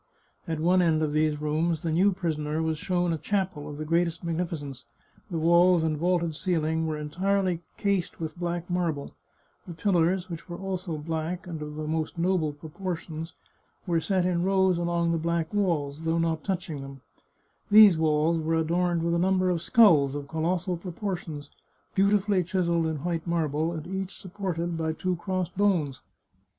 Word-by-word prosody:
At 160 -2 -2
one 180 +3 +4
end 160 -2 +2
of 150 -1 -1
these 155 -1 +1
rooms 155 +2 0
the 165 - -1
new 185 +5 +4
prisoner 155 -4 -2
was 160 -1 -1
shown 175 -1 0
a 160 - -3
chapel 190 -7 -2
of 145 - -7
the 155 - -4
greatest 170 +1 0
magnificence 165 -5 -4 0.2
— - - -32
the 170 - -3
walls 170 +1 +5
and 160 -1 +1
vaulted 170 +1 0
ceiling 160 -2 0
were 155 -1 -2
entirely 180 +3 0 0.2
cased 200 -4 -1
with 160 -2 -4
black 175 0 -3
marble; 170 -5 -2 0.5
the 170 - -7
pillars, 180 0 +1
which 170 0 -8
were 175 - -5
also 185 -4 -4
black, 160 +4 -3
and 165 -4 -6
of 150 0 -6
the 155 0 -4
most 160 +2 -2
noble 170 -3 +1
proportions, 160 +1 -6 0.5
were 170 -3 +1
set 185 -1 +1
in 175 -1 +1
rows 190 -1 +2
along 170 -1 +1
the 165 - 0
black 170 +1 -1
walls, 160 -8 0
though 165 0 0
not 165 -1 0
touching 180 -6 -3
them; 135 -1 -9 0.7
these 210 -3 +9
walls 160 +1 +2
were 160 +1 0
adorned 170 +1 +1
with 170 0 +1
a 170 - +2
number 185 0 +2
of 170 -2 -1
skulls 160 - +5
of 145 -1 -5
colossal 170 +4 -1
proportions, 175 -5 -5 0.4
beautifully 200 -1 +3
chiselled 170 -2 0
in 160 -1 -2
white 170 -1 -2
marble, 160 -1 0
and 160 -2 -5
each 190 +1 -4
supported 175 -3 -3
by 160 -1 -1
two 185 +3 -1
crossed 180 0 -3
bones. 180 -9 +1
170 Hz, 175 wpm, -27 LUFS, 160-180 Hz, 0.7 s, these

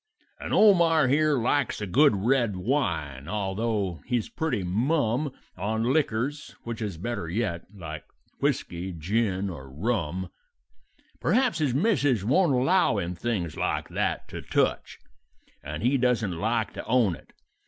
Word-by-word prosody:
"And - - -6
Omar 170 -8 +5
here 150 +1 +3
likes 135 +4 +1
a 105 - -3
good 135 +6 +4
red 115 +1 +1
wine, 85 - -1
although 100 -2 -2
he's 120 -4 -1
pretty 160 -11 -2
mum; 125 - 0 0.3
On 110 +2 -1
liquors, 145 -1 -1
which 115 -1 -5
is 100 -6 -3
better 100 -3 -4
yet, 95 -3 -2
like 80 -6 -8 0.4
whisky, 90 +2 -1
gin, 95 +3 0
or 75 -8 -7
rum; 90 - -2 0.9
Perhaps 250 -4 +2
his 140 -5 +1
missus 145 - +2
won't 150 - +3
allow 155 - +3
him 90 -2 -2
things 90 -4 -2
like - - -2
that - - -1
to - - -6
touch, - - 0 0.7
And 75 +6 -5
he 130 +3 +3
doesn't 120 -7 +1
like 110 +5 -1
to - - -7
own 115 -5 +3
it. - - -18
110 Hz, 140 wpm, -27 LUFS, 90-135 Hz, 0.9 s, Omar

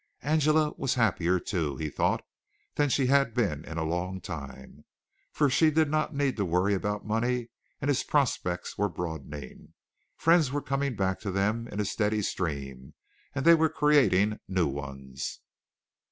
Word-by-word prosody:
Angela 155 0 +3
was 135 - 0
happier, 95 -6 +2
too, 80 - -2
he 75 - -3
thought, 75 - 0 0.5
than 145 -1 +1
she 135 0 +2
had 135 -3 +3
been 95 - 0
in 80 - -7
a 80 - 0
long 90 +3 -2
time, 70 -4 -9 0.5
for 145 - +2
she 155 +4 +4
did 155 -1 +2
not 155 0 +1
need 140 -3 0
to 100 - +1
worry 90 +3 +1
about 105 +1 -2
money 120 +2 -1 0.3
and 140 - -3
his 145 -3 +2
prospects 115 -14 -1
were 105 0 +2
broadening. 75 -6 -7 0.4
Friends 165 -5 +4
were 145 - 0
coming 140 -2 -2
back 95 -1 0
to 105 - -5
them 105 +5 0
in 105 - -6
a 105 - +1
steady 105 +1 0
stream, 70 -7 -4 0.4
and 140 - -2
they 170 - +9
were 160 -1 +4
creating 140 - +3
new 95 -2 +1
ones. 70 -1 -6
105 Hz, 165 wpm, -28 LUFS, 85-140 Hz, 0.5 s, they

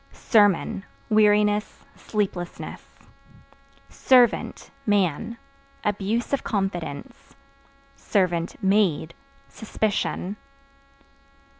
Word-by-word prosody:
Sermon 205 -2 +2 0.3
Weariness, 210 0 +2
sleeplessness. 190 -5 -4 1.0
Servant 250 -3 +2 0.2
(Man) 205 +2 +1 0.5
abuse 210 +5 -1
of 280 - 0
confidence; 195 - -4 1.3
(maid) 190 -5 +2 0.3
suspicion. 210 -2 -2
205 Hz, 50 wpm, -24 LUFS, 190-215 Hz, 1.3 s, Sermon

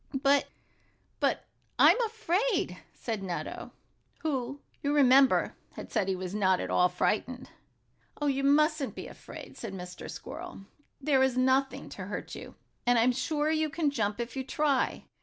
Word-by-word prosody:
"But 280 +1 +4 0.7
but - - +1 0.3
I'm - - +6
afraid," 430 - 0
said 225 -4 -4
Nutto, 180 -3 -5 0.5
who, 275 -3 -2 0.2
you 290 +1 0
remember, 270 -1 +5 0.2
had - - -9
said 195 - +1
he 190 - +1
was 185 0 -5
not 190 -3 +3
at - - -3
all 180 0 +4
frightened. 245 +8 -1 0.7
"Oh, 295 - -1
you 275 -1 +1
mustn't 300 0 +3
be - - -6
afraid," - - -11
said 220 -5 -6
Mr. 180 -1 -8
Squirrel. 325 - -8 0.3
"There 275 -2 +3
is 265 -1 +2
nothing 260 +1 +2
to - - -7
hurt - - -6
you. - - -9 0.3
I'm 245 0 +5
sure 295 +4 0
you 315 -1 +1
can 300 -1 0
jump 210 -4 -1
if 235 +2 -4
you 265 - -2
try. 280 0 0
265 Hz, 155 wpm, -29 LUFS, 225-295 Hz, 0.7 s, I'm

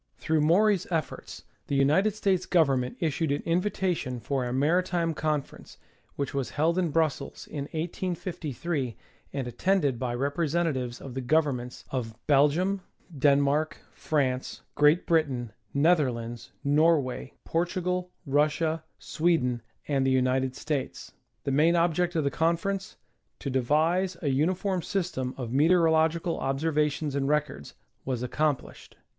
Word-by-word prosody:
Through 160 -1 +1
Maury's 190 +5 +3
efforts 165 -4 -4 0.2
the 140 - -1
United 155 +10 +3
States 195 -4 0
Government 135 -7 +2
issued 160 -1 0
an 145 - -1
invitation 175 -7 -1
for 135 +2 -2
a 120 - -3
mai'itime 165 +4 +1
conference, 150 -2 -3 0.4
Avhich 140 -2 -2
was 135 -2 -2
held 165 +5 +1
in 175 -3 +1
Brussels 155 -3 -1
in 140 -2 -5
1853 165 - -3 0.4
and 135 -3 -3
attended 140 - +1
by 125 -2 -2
representatives 140 -2 -1
of 135 - -8
the 130 - -3
governments 130 -3 0
of 115 -4 -3
Bel 145 0 +5
gium, 185 +6 0 0.4
Denmark, 145 +2 +2
France, 130 -4 -1
Great 150 +4 +4
Britain, 135 -9 0 0.2
Netherlands, 125 -7 +1
Norway, 145 -3 +2
Portugal, 180 +1 -1 0.2
Russia, 155 +3 +1
Sweden 135 -8 0 0.3
and 140 -2 +1
the 135 - +2
United 130 0 +1
States. 145 -2 -4 0.3
The 140 - -1
main 155 +5 +4
ob 170 0 +3
ject 175 +1 0
of 160 - +2
the 140 - 0
conference, 170 +5 -1 0.4
to 140 - -4
devise 160 +8 +1
a 145 - +1
uniform 180 +7 +1
system 165 -10 -2
of 120 -4 -5
meteoro 165 +5 +4
logical 160 +2 +1
observations 150 +1 0
and 135 -1 0
records, 150 - -1 0.3
was 125 -2 -2
accomplished. 145 +2 -2
150 Hz, 130 wpm, -27 LUFS, 135-170 Hz, 0.4 s, Bel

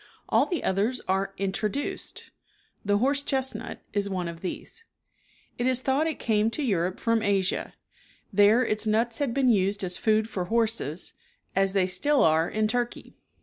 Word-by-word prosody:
All - - +3
the 350 - -2
others 210 +7 0
are 195 +1 0
introduced. 205 +7 -3 0.5
The 205 0 +2
horse 275 +5 +2
chestnut 265 -2 -3
is 200 -1 0
one 185 -3 -2
of 170 0 -7
these. 325 - -6 0.8
It 240 - +1
is 255 0 +2
thought 275 +4 +2
it 320 - -2
came 215 -1 +1
to 290 +6 -3
Europe 185 -6 0
from 230 -1 +1
Asia. 200 -2 0 0.6
There 210 +5 +5
its 215 0 0
nuts 225 +2 +1
had 285 -4 0
been 260 +1 +2
used 200 -2 +2
as 180 -1 0
food 220 0 +2
for 185 -5 -3
horses, 220 -7 -1 0.4
as 195 0 +2
they 195 -2 +3
still 255 +11 +2
are 160 +1 +3
in 215 0 0
Turkey. 240 +1 -3
215 Hz, 165 wpm, -27 LUFS, 190-245 Hz, 0.8 s, There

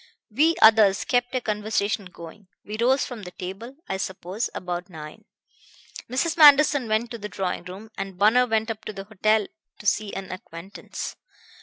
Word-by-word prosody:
We 310 +9 +3
others 215 -3 +6
kept 245 +1 0
a 255 - 0
conversation 210 -2 -1
going. 180 +2 -12 0.2
We 210 - -6
rose 260 +3 +3
from 245 -4 -8
the 180 - -8
table, 195 +8 -8
I 190 - -2
suppose, 190 +2 -4
about 180 +1 -4
nine. 155 -3 -10 0.8
Mrs. 310 +7 -1
Manderson 290 -4 +7
went 220 +2 0
to 235 - -6
the 210 0 -6
drawing 185 -3 -3
room, 195 +5 -10
and 195 -2 -5
Bunner 225 +6 +4
went 220 0 0
up 220 0 -8
to 215 - -5
the 195 -1 -7
hotel 215 +1 +1 0.3
to - - -14
see 205 0 +1
an 195 -1 -6
acquaintance. 185 +1 -8
210 Hz, 170 wpm, -24 LUFS, 190-235 Hz, 0.8 s, Manderson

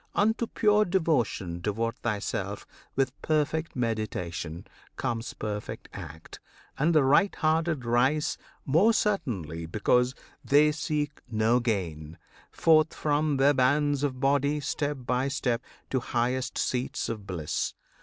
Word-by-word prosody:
Unto 220 +3 +2
pure 210 -1 +3
devotion 150 - 0
Devote 115 +4 -1
thyself: 105 -6 -3 0.3
with 135 -1 -1
perfect 155 +1 0
meditation 95 -9 -3 0.3
Comes 115 0 -3
perfect 105 -1 -5
act, 80 - -9 0.4
and 160 +3 +3
the 150 - +6
right 150 +9 +4
hearted 155 -3 +1
rise 130 +6 +2 0.3
More 175 +12 +4
certainly 100 - -1
because 125 +7 +2 0.3
they 150 +2 +5
seek 150 -1 -2
no 110 +2 +3
gain 85 -9 -3 0.3
Forth 155 -1 +3
from 150 -1 +1
the 140 +2 +5
bands 145 +2 +2
of 135 -3 -1
body, 140 +2 +2
step 145 0 -2
by 125 +2 0
step, 130 -3 -1 0.3
To 130 - +2
highest 125 +2 -1
seats 125 0 -1
of 105 -3 -5
bliss. 85 -5 -2
130 Hz, 125 wpm, -28 LUFS, 115-150 Hz, 0.4 s, the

